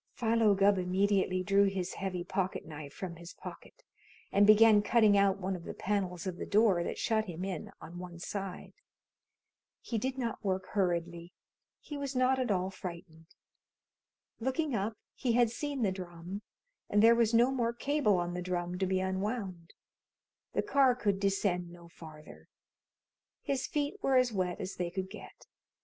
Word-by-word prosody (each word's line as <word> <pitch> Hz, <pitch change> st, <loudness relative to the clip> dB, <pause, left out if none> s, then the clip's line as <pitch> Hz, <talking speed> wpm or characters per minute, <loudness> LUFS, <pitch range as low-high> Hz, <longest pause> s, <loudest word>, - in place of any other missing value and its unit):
Philo 225 Hz, -3 st, +3 dB
Gubb 195 Hz, 0 st, +4 dB
immediately 185 Hz, 0 st, +1 dB
drew 200 Hz, +1 st, +4 dB
his 190 Hz, -2 st, -2 dB
heavy 185 Hz, -3 st, -3 dB
pocket 185 Hz, +1 st, -2 dB
knife 150 Hz, -2 st, -8 dB
from 170 Hz, +2 st, -7 dB
his 170 Hz, +1 st, -11 dB
pocket -, -, -11 dB, 0.5 s
and 200 Hz, +1 st, +5 dB
began 215 Hz, 0 st, +7 dB
cutting 215 Hz, -1 st, +4 dB
out 200 Hz, -1 st, +4 dB
one 190 Hz, 0 st, -2 dB
of 175 Hz, -, -8 dB
the -, -, -7 dB
panels 185 Hz, -3 st, -2 dB
of 185 Hz, -2 st, -4 dB
the -, -, -5 dB
door 205 Hz, -4 st, +4 dB
that -, -, -4 dB
shut 220 Hz, -1 st, +1 dB
him 180 Hz, -1 st, -5 dB
in 185 Hz, -4 st, -5 dB
on 170 Hz, +2 st, -9 dB
one 180 Hz, -1 st, -8 dB
side. 195 Hz, +1 st, -6 dB, 1.1 s
He 230 Hz, -, -3 dB
did 260 Hz, +4 st, -2 dB
not 235 Hz, -4 st, -3 dB
work 190 Hz, -2 st, -1 dB
hurriedly. 175 Hz, -3 st, -1 dB, 0.5 s
He 295 Hz, -, -7 dB
was 280 Hz, -1 st, -4 dB
not 255 Hz, +1 st, +3 dB
at 255 Hz, -, -1 dB
all 190 Hz, -1 st, 0 dB
frightened. 170 Hz, -3 st, -9 dB, 1.1 s
Looking 265 Hz, +5 st, -1 dB
up, 215 Hz, 0 st, -1 dB, 0.2 s
he 245 Hz, -3 st, -1 dB
had 240 Hz, -1 st, +4 dB
seen 280 Hz, 0 st, -3 dB
the 195 Hz, -, +2 dB
drum, 180 Hz, +1 st, -7 dB, 0.5 s
and 205 Hz, +1 st, +3 dB
there 230 Hz, +1 st, +8 dB
was 230 Hz, -2 st, +3 dB
no 240 Hz, +3 st, +5 dB
more 235 Hz, -3 st, 0 dB
cable 250 Hz, -4 st, +1 dB
on 175 Hz, 0 st, -2 dB
the 180 Hz, -, -3 dB
drum 180 Hz, 0 st, -3 dB
to 190 Hz, -, +1 dB
be 190 Hz, 0 st, +1 dB
unwound. 190 Hz, -2 st, -3 dB, 0.8 s
The -, -, +1 dB
car 275 Hz, -10 st, +4 dB
could 200 Hz, -5 st, 0 dB
descend 195 Hz, -3 st, 0 dB
no 170 Hz, -1 st, -13 dB
farther. 155 Hz, -2 st, -13 dB, 1.0 s
His 270 Hz, -2 st, -1 dB
feet 295 Hz, +7 st, -2 dB
were 270 Hz, -6 st, +2 dB
as 255 Hz, -2 st, +3 dB
wet 180 Hz, -3 st, -1 dB
as 185 Hz, -, -5 dB
they 175 Hz, -1 st, -1 dB
could 190 Hz, +1 st, -5 dB
get. 215 Hz, -, -11 dB
195 Hz, 170 wpm, -31 LUFS, 180-230 Hz, 1.1 s, there